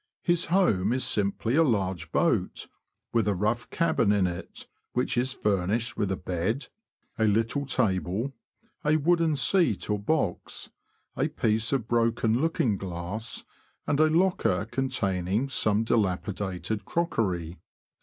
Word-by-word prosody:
His 175 -1 +2
home 120 - +2
is 130 - 0
simply 105 +4 0
a 165 - +5
large 95 - -1
boat, - - +1 0.5
with 115 -3 +2
a 105 - +2
rough 110 +6 -1
cabin 165 -10 +2
in 100 -2 +3
it, 85 -1 -5 0.3
which 125 +1 0
is 125 +2 +1
furnished 105 +2 0
with 100 -2 -1
a 95 - -1
bed, 95 - -2 0.5
a 110 - +4
little 115 +7 +1
table, 110 0 0 0.5
a 150 +1 +3
wooden 165 0 +2
seat 140 - +2
or 105 - 0
box, 105 - -2 0.4
a - - +1
piece 110 +1 0
of 130 -5 0
broken 115 0 +1
looking 135 -10 +1
glass, 95 +4 -4 0.4
and 145 - 0
a 155 0 +5
locker 165 - +2
containing 105 -2 -1
some 110 -4 +1
dilapidated 100 -2 -1
crockery. 95 - -1
110 Hz, 135 wpm, -27 LUFS, 95-135 Hz, 0.5 s, a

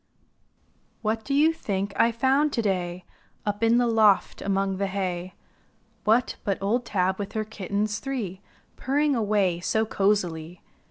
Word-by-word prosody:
What 220 +1 -1
do 275 - -1
you 310 +3 +4
think 200 -9 -3
I 230 - +4
found 270 +5 +2
to 230 - 0
day 180 -3 -2 0.4
Up 205 0 -2
in 230 +1 +4
the 245 - +3
loft 220 -4 +3
among 195 -1 0
the 200 0 0
hay? 185 -1 -3 0.7
What, 225 +4 +2
but 195 -2 0
old 230 +5 0
Tab 190 -2 0
with 200 - -5
her 215 -1 -1
kittens 210 0 -2
three 220 -9 -4 0.4
Purring 285 +2 +1
away 205 -6 +1
so 220 +5 0
cozily. 180 -5 -1
205 Hz, 150 wpm, -26 LUFS, 190-230 Hz, 0.7 s, you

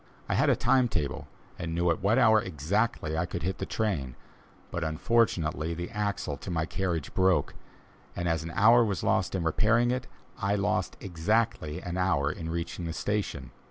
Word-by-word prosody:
I - - 0
had - - +3
a - - +5
time 130 -2 +3
table, 75 -10 -3 0.3
and 85 0 -3
knew 85 0 +2
at 85 - -2
what 100 +5 +3
hour 110 -4 +5
exactly 80 - -1
I 90 +2 0
could 85 - -5
hit 95 +2 -2
the - - -3
train; 80 - -2 0.6
but 85 - -2
unfortunately 80 -2 +1
the 85 +4 -5
axle 100 -9 -2
to - - -8
my 80 -3 0
carriage 85 -4 -2
broke, 95 -5 +2 0.6
and 85 - -2
as 80 -1 +1
an 80 - -6
hour 120 +3 +6
was 100 -4 -2
lost - - +1
in 90 - -1
repairing 115 +9 +3
it, 125 0 -2 0.3
I 100 +1 +1
lost 100 -2 -1
exactly 90 -2 -1
an 90 +1 -4
hour 75 -6 +2
in 80 +1 -6
reaching 85 +1 -4
the 80 - -3
station. 100 -10 -3
90 Hz, 185 wpm, -28 LUFS, 80-105 Hz, 0.6 s, hour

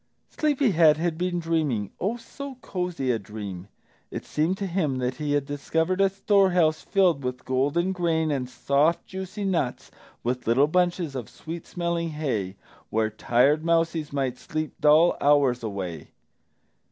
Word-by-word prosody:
Sleepy 290 -6 +1
head 160 -3 +5
had 165 0 -1
been 180 +1 -1
dreaming, 155 - -1
oh, 215 +5 -1
so 275 +4 -8
cosy 180 - -2
a 115 - 0
dream! 100 -3 -7 0.4
It - - -6
seemed 160 +5 0
to 200 - -3
him 170 -8 -1
that 125 0 -2
he 150 -2 -1
had 145 -1 +1
discovered 160 +6 -1
a 195 - +5
storehouse 185 -5 +3
filled 180 -8 +2
with 125 0 -4
golden 145 +8 +1
grain 165 -4 0
and 130 -3 -2
soft 145 +6 +1
juicy 190 +2 -6
nuts 165 -10 -1 0.3
with 125 0 -2
little 125 +5 +5
bunches 175 -1 0
of 125 -5 -5
sweet 165 +1 -8
smelling 170 -1 -2
hay, 125 -12 -2 0.3
where 110 0 0
tired 130 +8 +2
mousies 165 -2 +1
might 135 -3 -2
sleep 155 -1 -4
dull 155 +3 +5
hours 140 -4 +4
away. 95 -8 -5
155 Hz, 155 wpm, -25 LUFS, 130-175 Hz, 0.4 s, head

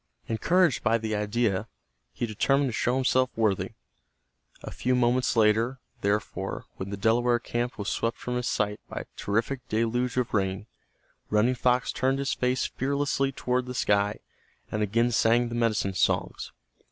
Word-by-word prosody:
Encouraged 165 +7 +2
by 115 0 +3
the 110 -1 -2
idea, 105 -1 0 0.4
he 120 - -3
determined 135 +5 +1
to - - -5
show 120 +3 +1
himself 130 -1 +2
worthy. 110 -4 0 0.9
A - - -6
few 125 +1 0
moments 125 0 +2
later, 115 +4 +3 0.2
therefore, 105 +1 -2
when 95 - -5
the 100 - -4
Delaware 120 +4 +3
camp 120 +1 -3
was 100 -1 -4
swept 115 +1 -1
from 125 - -4
his 125 0 -1
sight 105 0 0
by - - -4
a - - -10
terrific 115 +6 -1
deluge 120 +3 0
of 125 -2 0
rain, 95 -1 0 0.6
Running 105 +4 +3
Fox 125 0 +1
turned 135 +1 +1
his 140 0 -1
face 125 +1 0
fearlessly 140 0 0
toward 125 -1 -1
the 125 - -5
sky, 105 -3 +1 0.5
and 110 - -1
again 115 +4 +2
sang 120 +1 +3
the - - -6
medicine 110 -4 +1
songs. - - 0
120 Hz, 160 wpm, -27 LUFS, 105-125 Hz, 0.9 s, by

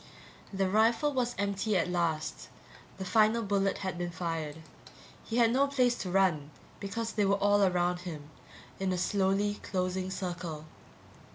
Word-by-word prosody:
The 195 -1 0
rifle 230 +9 +3
was 245 -2 0
empty 200 +1 0
at 170 - +1
last, 170 -3 -2 0.5
the 190 - -5
final 220 +4 +3
bullet 195 -1 +1
had 185 -2 -3
been 175 0 -2
fired. 165 -3 -3 0.7
He 225 - -3
had 230 -2 +5
no 275 +2 +3
place 255 -3 +2
to 185 - -4
run 175 -6 +2 0.3
because 225 +3 -3
they 210 -1 +1
were 200 0 +3
all 205 +1 +3
around 180 -2 +2
him, 155 -4 -8 0.5
in 190 -1 0
a 185 - 0
slowly 200 +2 +1
closing 185 0 -2
circle. 175 -5 -5
195 Hz, 155 wpm, -30 LUFS, 175-215 Hz, 0.7 s, had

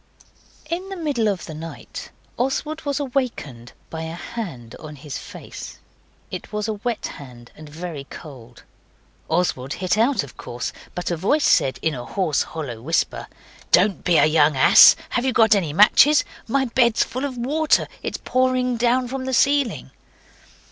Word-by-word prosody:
In 350 +4 -4
the 390 - -5
middle 290 - -1
of 195 -4 -2
the 155 - -8
night 160 +2 -8 0.3
Oswald 300 +5 -2
was 285 0 -1
awakened 245 - -3 0.2
by 160 - -5
a 160 +1 -5
hand 170 - -7
on 155 -1 -9
his 145 0 -7
face. - - -10 0.5
It - - -7
was 210 0 -2
a 220 - -1
wet 230 +2 -3
hand 125 -5 -10
and 155 -1 -12
very 155 -2 -7
cold. 125 -7 -12 0.7
Oswald 160 -6 0
hit 185 +3 -1
out, 245 - +2
of 140 - -13
course, 120 +1 -5 0.2
but 180 0 -3
a - - +1
voice 280 - +1
said, 130 - +3
in 160 - +1
a 125 -3 -6
hoarse, 170 -4 0
hollow 135 -9 -6
whisper 165 +7 -1 0.4
'Don't 195 +2 +3
be 175 -3 +3
a - - +6
young 155 -2 +3
ass! - - +8
Have 245 - -1
you 260 -1 0
got 225 -2 +5
any 185 -7 +1
matches? 215 - +6 0.2
My 265 +3 +1
bed's 235 -2 +3
full 255 +3 -5
of 270 -3 -4
water; 300 +6 +1
it's - - -4
pouring 255 -1 0
down 245 +2 +2
from 260 +1 -5
the 260 -1 0
ceiling. 280 0 +1
200 Hz, 170 wpm, -22 LUFS, 150-255 Hz, 0.7 s, ass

